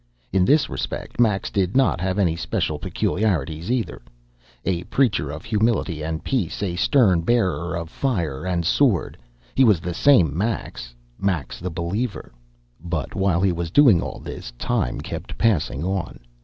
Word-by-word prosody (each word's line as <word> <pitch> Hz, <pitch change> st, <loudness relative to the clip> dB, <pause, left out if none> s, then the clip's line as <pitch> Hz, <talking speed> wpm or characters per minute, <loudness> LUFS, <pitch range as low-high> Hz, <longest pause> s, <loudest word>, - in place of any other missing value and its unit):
In 95 Hz, -1 st, +4 dB
this 145 Hz, +3 st, +4 dB
respect -, -, -5 dB
Max 105 Hz, -5 st, +2 dB
did 95 Hz, +3 st, 0 dB
not 130 Hz, -10 st, +3 dB
have 95 Hz, +1 st, -1 dB
any 90 Hz, -5 st, +2 dB
special -, -, -2 dB
peculiarities, 85 Hz, -4 st, -1 dB
either. 125 Hz, -2 st, -1 dB, 0.6 s
A 90 Hz, -3 st, 0 dB
preacher 115 Hz, -, +1 dB
of 80 Hz, +2 st, -7 dB
humility 105 Hz, -7 st, 0 dB
and 80 Hz, 0 st, -3 dB
peace, 105 Hz, -7 st, -1 dB
a 90 Hz, -3 st, -2 dB
stern 95 Hz, -, +3 dB
bearer 90 Hz, -5 st, 0 dB
of 85 Hz, -1 st, -5 dB
fire 85 Hz, -, -2 dB
and 90 Hz, -2 st, -1 dB
sword, 110 Hz, -, +2 dB, 0.4 s
he 135 Hz, -, +4 dB
was 105 Hz, -8 st, +5 dB
the 90 Hz, +1 st, -4 dB
same 85 Hz, -, +4 dB
Max 95 Hz, -, -3 dB, 0.2 s
Max 90 Hz, -10 st, -2 dB
the 90 Hz, -, -4 dB
believer. 95 Hz, +7 st, -3 dB, 0.5 s
But 80 Hz, -4 st, -3 dB
while 95 Hz, -3 st, +1 dB
he 95 Hz, -1 st, +3 dB
was 85 Hz, -1 st, -3 dB
doing 115 Hz, -, +6 dB
all -, -, -5 dB
this, 60 Hz, -, -8 dB
time -, -, -1 dB
kept -, -, -7 dB
passing 80 Hz, -, +1 dB
on. 95 Hz, -1 st, -3 dB
95 Hz, 155 wpm, -23 LUFS, 85-110 Hz, 0.6 s, doing